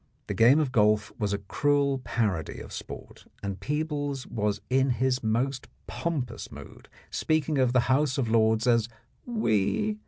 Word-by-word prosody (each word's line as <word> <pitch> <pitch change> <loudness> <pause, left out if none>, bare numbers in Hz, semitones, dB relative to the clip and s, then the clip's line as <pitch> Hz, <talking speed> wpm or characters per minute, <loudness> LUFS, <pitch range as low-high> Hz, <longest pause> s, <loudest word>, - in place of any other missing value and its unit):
The - - -3
game 120 +6 +6
of 145 -5 0
golf 105 -3 +3
was 105 -2 0
a 100 - 0
cruel 140 +5 +1
parody 105 - -2
of - - -9
sport, - - -9 0.2
and 100 -2 -4
Peebles 145 +1 -2
was 105 -2 -1
in 135 +1 +2
his 130 +1 +1
most 120 +5 -1 0.2
pompous 135 -9 -4
mood, - - -12 0.2
speaking 155 -2 0
of 130 -2 +3
the 125 -1 +4
House 130 +3 +1
of 130 -4 0
Lords 110 0 +3
as 115 -2 +3 0.4
"we." 210 - 0
125 Hz, 155 wpm, -27 LUFS, 110-145 Hz, 0.4 s, game